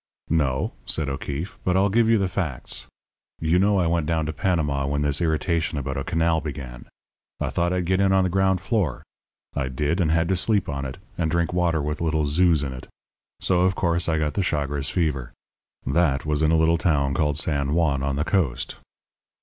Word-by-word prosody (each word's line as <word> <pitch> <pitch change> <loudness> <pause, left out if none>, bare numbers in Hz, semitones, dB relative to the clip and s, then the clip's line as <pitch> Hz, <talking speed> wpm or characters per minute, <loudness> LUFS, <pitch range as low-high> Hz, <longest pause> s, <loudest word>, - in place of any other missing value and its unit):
"No," 70 -5 +1
said 75 -3 -1
O'Keefe; 70 +6 -5
"but 90 0 +2
I'll 100 +1 +3
give 115 +1 +3
you 115 - +5
the 100 -2 +1
facts. 80 -8 -4 0.5
You 80 +3 +2
know 100 +1 +3
I 90 - +2
went 85 -2 0
down 80 -2 0
to 80 - -3
Panama 75 -6 0
when 70 +1 0
this 70 +1 0
irritation 80 0 0
about 65 -1 -3
a 70 - -2
canal 80 0 +1
began. 65 -5 -7 0.5
I - - -2
thought 85 +1 0
I'd 90 -1 0
get 95 +2 +2
in 95 -1 +3
on 95 0 +4
the 95 - +1
ground 95 0 +2
floor. 95 - -1 0.5
I 70 -3 -1
did, 75 +7 -1
and 80 - +2
had 80 +1 +2
to 95 - +3
sleep 100 +1 +1
on 70 -1 -3
it, 65 - -6 0.2
and 80 -2 +1
drink 85 +1 0
water 85 -4 +1
with 75 +2 -3
little 80 -2 +1
zoos 80 0 +3
in 70 -2 -3
it; 65 - -9 0.5
so, 90 -2 +2
of 95 +1 +2
course, 85 -1 0
I 80 - +1
got 75 -2 0
the 100 - 0
Chagres 70 -4 -1
fever. 70 -8 -1 0.5
That 70 0 +1
was 75 -1 0
in 80 - +3
a 80 - +4
little 80 +1 +3
town 70 -5 +1
called 75 -1 +1
San 70 -1 0
Juan 75 -5 +2
on 70 0 -1
the 75 +2 -1
coast. 70 -11 -1
80 Hz, 210 wpm, -24 LUFS, 70-90 Hz, 0.5 s, you